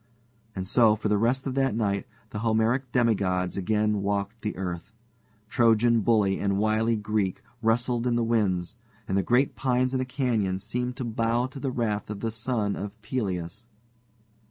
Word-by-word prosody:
And 95 -1 -4
so 110 +1 +5
for 110 0 -2
the 105 - +3
rest 125 +4 +1
of 135 - -2
that 135 -4 +1
night 100 -3 -1 0.2
the 105 - -4
Homeric 115 +3 +1
demigods 95 -7 +1
again 105 +1 +1
walked 100 +2 -2
the 105 - -3
earth. 90 0 -5 0.6
Trojan 115 +1 +3
bully 100 -3 +2
and 100 -1 0
wily 110 +2 +2
Greek 105 -3 -1 0.2
wrestled 120 +2 +1
in 120 - +2
the 120 - +1
winds, 105 -4 0 0.3
and 95 - -1
the 100 - +3
great 125 +7 +2
pines 130 0 +1
in 130 - +1
the - - +1
canyon 120 -8 0
seemed 125 +5 -3
to 130 -2 -4
bow 115 +1 0
to 135 +2 -8
the 135 - -2
wrath 110 -5 -2
of 105 -1 -5
the 115 - -1
son 110 -2 -1
of 100 +2 -6
Peleus. 100 -2 -3
110 Hz, 175 wpm, -26 LUFS, 100-120 Hz, 0.6 s, so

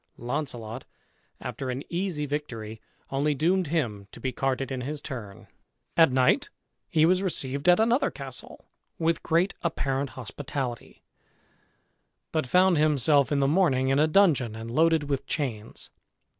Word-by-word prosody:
Launcelot, 120 -2 -4 0.6
after 130 - -5
an 130 +3 -3
easy 175 -4 -2
victory, 115 -7 -5 0.3
only 145 +2 +1
doomed 175 +5 +2
him 115 -11 -2
to - - -12
be 130 - -2
carted 135 +1 -1
in 130 -1 -3
his 145 +4 -4
turn. 115 -9 -8 0.5
At 165 -5 +6
night 130 0 +3 0.4
he 155 -1 +4
was 180 +2 +3
received 140 -4 -1
at 175 - +6
another 235 +5 +3
castle, - - -8 0.3
with 165 0 +1
great 170 +4 +1
apparent 140 -4 -1
hospitality, 130 0 -5 1.3
but 155 -4 -1
found 180 +2 +4
himself 145 -2 +3
in 145 - +2
the 135 -1 +3
morning 140 -5 +3
in 135 +1 +3
a 155 - +4
dungeon, 155 - +3
and 115 +1 -7
loaded 160 +3 +3
with 140 -2 -2
chains. 115 -8 -4
140 Hz, 145 wpm, -27 LUFS, 130-165 Hz, 1.3 s, At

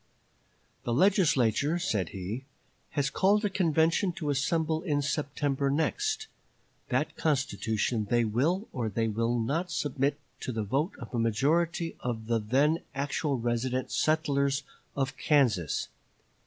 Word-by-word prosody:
"The 120 - -1
Legislature," 155 - +3
said 105 - -1
he, 100 +8 -5 0.5
"has 140 0 +1
called 205 +4 +3
a 205 - 0
convention 170 0 +2
to 150 -3 -2
assemble 160 +3 0
in 145 -5 0
September 140 -1 -1
next. 420 - 0 0.6
That - - 0
constitution 120 -6 0
they 120 -1 +3
will 155 - 0
or 120 -4 -1
they 115 +2 0
will 115 +2 0
not 155 +11 -1
submit 145 -3 -1 0.2
to - - -4
the 110 -2 -2
vote 140 - 0
of 120 -2 -10
a 120 - 0
majority 160 +9 +1
of 115 -3 -3
the 115 0 +1
then 140 +9 +2 0.2
actual 140 0 -1
resident 120 +2 -1
settlers 140 -3 +1 0.3
of 135 -1 -1
Kansas. 120 - +2
140 Hz, 130 wpm, -29 LUFS, 120-160 Hz, 0.6 s, Legislature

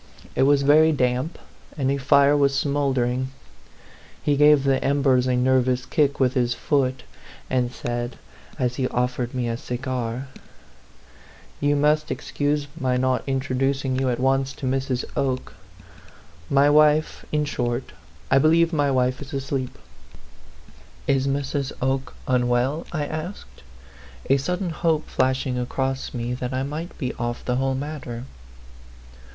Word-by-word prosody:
It - - +1
was 140 -1 +4
very 155 +3 +6
damp, 130 +2 0 0.4
and 135 -2 +1
a 140 - 0
fire 140 +2 +4
was 140 -1 +2
smouldering. 130 -3 0 1.0
He 145 - +2
gave 150 -1 +6
the 135 -1 +1
embers 135 -3 +2
a 125 - +2
nervous 125 0 +2
kick 140 +1 +1
with 130 -2 +3
his 120 -1 +1
foot, 130 0 0 0.5
and 125 -2 +1
said, 120 0 -4 0.4
as 125 -1 -1
he 130 - +1
offered 125 0 -2
me 125 -2 -1
a 115 0 -2
cigar 125 0 -4 0.7
" - - -25
You 145 0 +3
must 150 +1 +2
excuse 145 +2 -1
my 130 -2 +1
not 130 0 +1
introducing 135 0 0
you 130 -1 +1
at 120 - -1
once 135 +1 +1
to 140 - -7
Mrs. 130 -1 -1
Oke. 130 -2 -1 1.0
My 140 +1 +4
wife 150 +1 +3
in 150 0 +1
short, 120 -4 -2 0.4
I - - +6
believe 165 +3 +4
my 145 -2 +2
wife 130 0 +1
is 145 +1 -9
asleep." 135 -1 -3 0.7
" - - -24
Is 135 0 +1
Mrs. 140 0 -1
Oke 130 +1 -1
unwell 125 +4 +1
?" - - -16
I 150 -3 -2
asked, 155 +6 -7 0.7
a 135 - +6
sudden 180 +5 -2
hope 160 -1 0
flashing 130 -1 0
across 130 +2 -2
me 120 -1 -3
that 125 +1 -4
I 130 - 0
might 155 +5 -5
be 130 -5 -3
off 120 0 -3
the 125 0 0
whole 135 0 0
matter. 135 -4 -5
135 Hz, 145 wpm, -23 LUFS, 125-145 Hz, 1.0 s, very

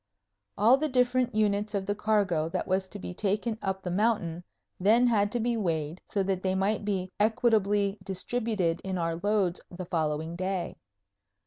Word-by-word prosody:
All 230 +6 +6
the 305 +2 -1
different 250 -2 +2
units 210 0 +1
of 195 -1 -1
the 205 - 0
cargo 200 -7 +1
that 185 +1 -3
was 190 0 0
to 205 - -6
be 180 - -6
taken 210 +4 -1
up 190 -1 -2
the 180 - -3
mountain 185 -4 0 0.4
then 220 +6 +5
had 205 -4 +2
to 240 - 0
be 235 +1 0
weighed, 165 -5 -2
so 200 - 0
that 190 -1 -1
they 190 0 0
might 200 +3 0
be 190 -3 -2
equitably 210 -2 +2
distributed 195 -3 -1
in 190 -1 -3
our 165 -1 -1
loads 195 -1 0
the 180 0 -7
following 160 -1 -1
day. 185 0 -2
200 Hz, 175 wpm, -28 LUFS, 180-215 Hz, 0.4 s, All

